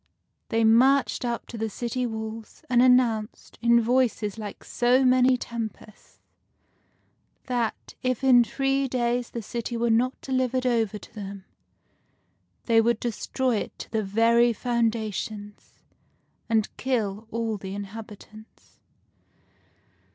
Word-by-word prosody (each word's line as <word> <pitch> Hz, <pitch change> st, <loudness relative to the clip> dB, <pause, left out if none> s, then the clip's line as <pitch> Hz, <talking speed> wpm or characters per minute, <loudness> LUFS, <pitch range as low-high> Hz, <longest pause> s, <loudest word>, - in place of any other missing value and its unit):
They 225 Hz, 0 st, +1 dB
marched 255 Hz, +5 st, +4 dB
up 235 Hz, -1 st, -3 dB
to 230 Hz, -, -9 dB
the 225 Hz, 0 st, -1 dB
city 245 Hz, +3 st, -3 dB
walls, 220 Hz, 0 st, -7 dB
and 240 Hz, -1 st, +5 dB
an 250 Hz, 0 st, +7 dB
nounced, 225 Hz, -4 st, -3 dB
in 235 Hz, 0 st, +5 dB
voices 230 Hz, -3 st, 0 dB
like 210 Hz, -2 st, -7 dB
so 250 Hz, +2 st, +2 dB
many 255 Hz, 0 st, +4 dB
tempests, 225 Hz, -3 st, -8 dB, 1.3 s
that, 240 Hz, -3 st, -3 dB
if 255 Hz, 0 st, -1 dB
in 250 Hz, -2 st, +6 dB
three 270 Hz, +2 st, 0 dB
days 245 Hz, -1 st, -1 dB
the 235 Hz, -, -6 dB
city 235 Hz, +2 st, -4 dB
were 235 Hz, 0 st, +1 dB
not 250 Hz, +3 st, +1 dB
delivered 255 Hz, -1 st, -1 dB
over 225 Hz, -4 st, +1 dB
to -, -, -15 dB
them, 200 Hz, -2 st, -8 dB, 1.2 s
they 225 Hz, -1 st, +4 dB
would 235 Hz, 0 st, +1 dB
destroy 245 Hz, +1 st, -1 dB
it -, -, -5 dB
to -, -, -9 dB
the 220 Hz, -1 st, 0 dB
very 230 Hz, +4 st, +3 dB
foundations, 220 Hz, -3 st, -3 dB, 0.8 s
and 220 Hz, -2 st, 0 dB
kill 220 Hz, -5 st, -2 dB
all 225 Hz, -1 st, -2 dB
the 195 Hz, 0 st, -7 dB
inhabitants. 215 Hz, +1 st, -11 dB
230 Hz, 125 wpm, -26 LUFS, 220-250 Hz, 1.3 s, an